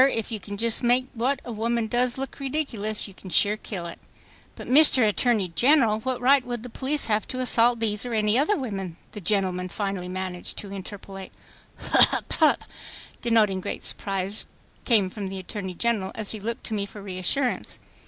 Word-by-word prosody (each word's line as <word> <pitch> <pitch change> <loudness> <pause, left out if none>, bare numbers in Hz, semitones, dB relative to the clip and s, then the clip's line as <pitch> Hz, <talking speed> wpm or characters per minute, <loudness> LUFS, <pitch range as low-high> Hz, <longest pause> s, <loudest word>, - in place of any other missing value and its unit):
If 225 0 -3
you 220 - -3
can 205 0 -8
just 230 +1 +4
make 245 +2 +3
what 260 +3 -1
a 245 - -6
woman 230 +1 -1
does 245 +2 +1
look 270 +2 -6
ridiculous, 260 -8 -2
you 195 - -13
can 185 - -12
sure 205 +4 +3
kill 195 -5 -6
it... 170 - -8 0.3
." - - -28
"But, - - -9
Mr. 260 -4 +7
Attorney 210 -2 +1
General, 235 - +3
what 255 +2 -3
right 265 +2 +4
would 240 -2 -5
the 250 - -8
police 280 +5 -1
have 215 -1 0
to 255 - -5
assault 240 -1 +3
these 210 -2 0
or 245 -2 -3
any 210 0 +2
other 300 - +2
women?" 195 - -5
the 210 - -8
gentleman 185 -1 0
managed - - -12
finally 185 -2 -4
to 200 -1 -7
interpolate. 195 0 -9 0.5
"Hup—hup—" - - +3 0.6
denoting 215 -5 +2
great - - -5
surprise, 195 +1 -1 0.4
came 205 -6 +3
from 200 -1 -5
the 190 0 -6
Attorney 190 0 -6
General, 220 -3 -1
as 215 -2 -2
he 220 - -3
looked 230 +3 -4
to - - -5
me 200 -1 -2
for 205 0 -11
reassurance. 195 +7 -1
215 Hz, 185 wpm, -25 LUFS, 195-245 Hz, 0.6 s, Mr